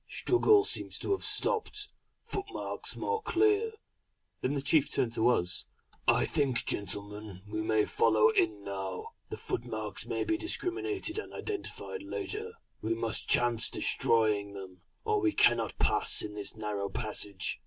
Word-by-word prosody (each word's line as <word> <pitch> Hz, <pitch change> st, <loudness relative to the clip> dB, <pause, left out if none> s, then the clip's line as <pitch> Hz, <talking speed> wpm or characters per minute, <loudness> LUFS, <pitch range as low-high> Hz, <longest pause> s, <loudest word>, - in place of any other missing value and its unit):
Struggle 405 Hz, +3 st, +4 dB
seems -, -, -1 dB
to -, -, -3 dB
have 390 Hz, -, 0 dB
stopped. 430 Hz, -3 st, +1 dB, 0.3 s
Footmarks 400 Hz, 0 st, -4 dB
more 455 Hz, -1 st, -1 dB
clear."... 425 Hz, +4 st, +2 dB, 0.7 s
Then 135 Hz, +3 st, 0 dB
the 140 Hz, -, -2 dB
chief 145 Hz, 0 st, +3 dB
turned 115 Hz, -2 st, +1 dB
to 115 Hz, +1 st, +3 dB
us: 90 Hz, -7 st, +1 dB, 0.4 s
"I -, -, +4 dB
think 140 Hz, -6 st, 0 dB
gentlemen, 100 Hz, 0 st, -3 dB
we 110 Hz, +1 st, -3 dB
may 110 Hz, -1 st, +2 dB
follow 110 Hz, +4 st, +4 dB
in 110 Hz, -7 st, +1 dB
now. 100 Hz, -, -5 dB, 0.2 s
The -, -, -5 dB
footmarks -, -, -4 dB
may -, -, -1 dB
be 330 Hz, -1 st, 0 dB
discriminated 375 Hz, +2 st, -1 dB
and -, -, -7 dB
identified 430 Hz, +2 st, -5 dB
later. 430 Hz, +2 st, -4 dB, 0.3 s
We 115 Hz, +1 st, 0 dB
must 115 Hz, -1 st, +1 dB
chance 120 Hz, -1 st, +3 dB
destroying 105 Hz, -3 st, +2 dB
them, 95 Hz, -2 st, -9 dB, 0.2 s
or 430 Hz, -2 st, +2 dB
we 335 Hz, -4 st, +2 dB
cannot 115 Hz, -2 st, +3 dB
pass -, -, +2 dB
in 105 Hz, -, -6 dB
this 105 Hz, +1 st, -4 dB
narrow 105 Hz, -2 st, -3 dB
passage." 100 Hz, -4 st, -2 dB
120 Hz, 145 wpm, -31 LUFS, -, 0.7 s, Struggle